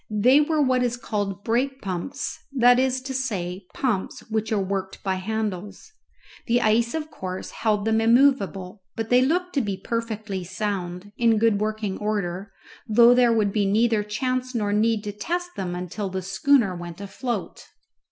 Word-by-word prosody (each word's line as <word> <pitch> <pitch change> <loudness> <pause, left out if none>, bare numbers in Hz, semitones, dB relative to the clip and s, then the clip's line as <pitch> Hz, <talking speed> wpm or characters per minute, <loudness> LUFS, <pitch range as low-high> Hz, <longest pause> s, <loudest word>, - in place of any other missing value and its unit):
They 245 +7 +5
were 310 +1 +1
what 255 -2 +2
is 240 -1 0
called 205 -4 -3
brake 265 +4 0
pumps 195 +9 -4
that 245 -1 +5
is 260 0 +1
to 265 +1 -5
say, 195 -8 -3
pumps 225 -8 -1
which 220 0 -1
are 215 - +2
worked 195 -1 -3
by 190 -2 0
handles. 205 - -4 0.6
The 240 +1 +3
ice, 230 +2 +2
of 310 -1 -4
course, 185 0 -6
held 210 -2 0
them 225 0 +2
immovable, 225 -6 +2
but 225 -1 -3
they 250 0 +6
looked 360 +7 0
to 280 - +2
be 200 -4 -3
perfectly 220 -2 -4
sound, 185 0 -4
in 230 -2 +4
good 215 -2 +2
working 215 -2 -2
order, 200 -2 -2 0.4
though 235 +2 +7
there 245 -1 +4
would 210 -3 +1
be 205 -2 +1
neither 220 +2 +3
chance 255 +4 -2
nor 205 -3 0
need 220 0 +2
to 210 - -4
test 350 - -3
them 180 -2 -3
until 180 +3 -4
the 190 0 -4
schooner 200 +1 +2
went 175 0 -8
afloat. 215 +5 -5
215 Hz, 170 wpm, -24 LUFS, 195-245 Hz, 0.6 s, though